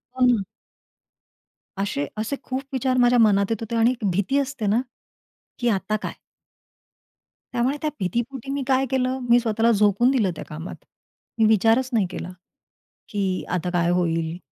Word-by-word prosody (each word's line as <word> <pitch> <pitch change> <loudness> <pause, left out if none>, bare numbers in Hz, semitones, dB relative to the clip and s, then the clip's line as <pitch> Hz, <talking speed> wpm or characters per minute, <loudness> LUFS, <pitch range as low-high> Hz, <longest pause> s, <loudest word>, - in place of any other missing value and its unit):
हो 255 - +3
ना. 230 -6 +3 1.3
अशे 170 -8 -2
असे 225 +6 -2
खूप 260 0 -3
विचार 255 0 0
माझ्या 245 0 +4
मनात 200 -3 +4
येत 225 -1 -2
होते 225 +1 -4
आणि 230 +2 +4 0.2
भीती 200 +9 0
असते 265 -5 -3
ना, 225 +5 +3 0.8
की 240 -1 +1
आता 205 +1 0
काय? - - -4 1.4
त्यामुळे 250 +4 +1
त्या 310 - 0
भीतीपोटी 240 +7 -3
मी 280 -1 -2
काय 265 0 +3
केलं. 260 0 0
मी 240 - +7
स्वतःला 230 0 +2
झोकून 210 +4 +3
दिलं 215 -9 +2
त्या - - -7
कामात. 160 +3 -7 0.6
मी 220 - +4
विचारच 225 +4 +3
नाही 205 -5 +2
केला 180 - -6 0.8
की 195 -3 -1
आता 180 0 -1
काय 170 -1 +1
होईल? 165 -1 0
225 Hz, 155 wpm, -23 LUFS, 195-255 Hz, 1.4 s, मी